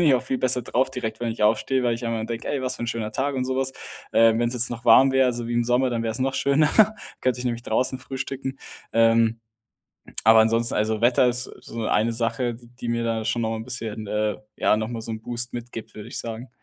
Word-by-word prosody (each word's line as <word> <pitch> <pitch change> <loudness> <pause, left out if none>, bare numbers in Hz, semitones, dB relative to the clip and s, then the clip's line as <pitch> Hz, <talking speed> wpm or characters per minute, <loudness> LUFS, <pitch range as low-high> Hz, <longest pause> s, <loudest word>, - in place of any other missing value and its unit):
bin - - +4
ich 145 -4 +6
auch 125 - +1
viel 130 0 -2
besser 125 -1 +1
drauf 130 +3 +1
direkt, 115 -4 -4
wenn 120 -1 -1
ich 110 - -5
aufstehe, 115 +5 +2
weil 120 -1 +2
ich 115 +1 -5
einmal 115 -1 -2
denke: 115 0 -5
„Ey, 140 -2 -1
was 130 - -2
für - - -7
‘n 120 - -2
schöner 115 -2 -3
Tag“, 140 +3 -1
und 130 -1 -1
so 130 0 -2
was. 135 0 0 0.4
Ähm, 115 0 +5
wenn's 120 +1 0
jetzt 120 -1 +2
noch 120 -1 -6
warm 130 +3 +7
wäre, 130 -1 +4
so 120 -1 -5
wie - - -2
im 120 0 +2
Sommer, 125 +2 +2
dann 115 -1 -1
wär's 115 +2 -3
noch 135 +1 +1
schöner. 145 +2 +3 0.5
könnte 125 -1 0
ich - - -5
nämlich 120 -1 -2
draußen 130 +3 0
frühstücken. 135 0 -5 0.4
Ähm, 115 0 +3 0.9
aber 110 0 +8
ansonsten, 115 +1 +1
also, 110 0 0
Wetter 120 +1 +4
ist, 125 +1 -1
äh, - - -11
so 115 -1 -5
eine 110 +3 +2
Sache, 120 +1 -1
d 120 0 -16
die 120 - -3
mir 115 0 0
da 115 -1 -1
schon 120 - 0
noch 110 - -1
mal 115 - -2
‘n 110 - -6
bisschen, 110 -4 -5
äh, 105 0 0 0.2
ja, - - +3
noch 110 +1 -3
mal 115 -2 -4
so 115 - -6
‘n 110 - -5
Boost 120 +1 -4
mitgibt, 115 -2 -7
würde 105 +1 -9
ich - - -4
sagen. 115 +2 -6
120 Hz, 260 wpm, -24 LUFS, 115-130 Hz, 0.9 s, aber